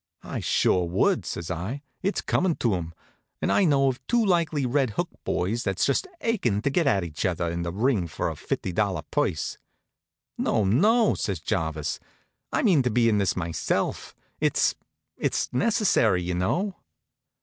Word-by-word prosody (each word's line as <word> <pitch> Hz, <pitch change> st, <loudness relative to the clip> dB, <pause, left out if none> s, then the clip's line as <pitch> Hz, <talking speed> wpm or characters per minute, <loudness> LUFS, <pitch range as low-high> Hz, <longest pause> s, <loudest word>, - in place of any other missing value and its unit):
"I -, -, -4 dB
sure 90 Hz, -1 st, +2 dB
would," 85 Hz, +3 st, +1 dB
says 85 Hz, +1 st, -4 dB
I. 100 Hz, -, -4 dB, 0.2 s
"It's 195 Hz, +2 st, 0 dB
comin' 175 Hz, -3 st, +1 dB
to 115 Hz, -4 st, +1 dB
'em. 85 Hz, -2 st, -4 dB, 0.4 s
And -, -, 0 dB
I 200 Hz, -, +4 dB
know 140 Hz, -4 st, +3 dB
of 130 Hz, -1 st, -2 dB
two 240 Hz, -2 st, +2 dB
likely 165 Hz, -7 st, +1 dB
Red 130 Hz, 0 st, +1 dB
Hook -, -, 0 dB
boys 105 Hz, +7 st, -1 dB
that's 95 Hz, -4 st, 0 dB
just 390 Hz, -, +1 dB
achin' 125 Hz, -, 0 dB
to 140 Hz, -, +1 dB
get 165 Hz, +1 st, +2 dB
at 100 Hz, -8 st, +3 dB
each 80 Hz, -3 st, -5 dB
other 85 Hz, -2 st, 0 dB
in 85 Hz, 0 st, -3 dB
the 85 Hz, 0 st, -3 dB
ring 105 Hz, -2 st, +1 dB
for 80 Hz, -, -3 dB
a -, -, -3 dB
fifty 95 Hz, -, -3 dB
dollar 100 Hz, +1 st, 0 dB
purse." -, -, -1 dB, 0.8 s
"No, 110 Hz, -, +1 dB
no," 210 Hz, -, +4 dB
says 95 Hz, -5 st, -2 dB
Jarvis. 80 Hz, -5 st, -2 dB, 0.5 s
"I -, -, 0 dB
mean 180 Hz, -, +5 dB
to 125 Hz, -, +1 dB
be 115 Hz, 0 st, +3 dB
in 105 Hz, -2 st, +2 dB
this 100 Hz, -, +1 dB
myself. 85 Hz, -3 st, -2 dB, 0.2 s
It's -, -, +2 dB, 0.4 s
it's -, -, -1 dB
necessary, 125 Hz, -, +2 dB
you 90 Hz, +1 st, -2 dB
know." 175 Hz, -, -1 dB
110 Hz, 170 wpm, -26 LUFS, -, 0.8 s, mean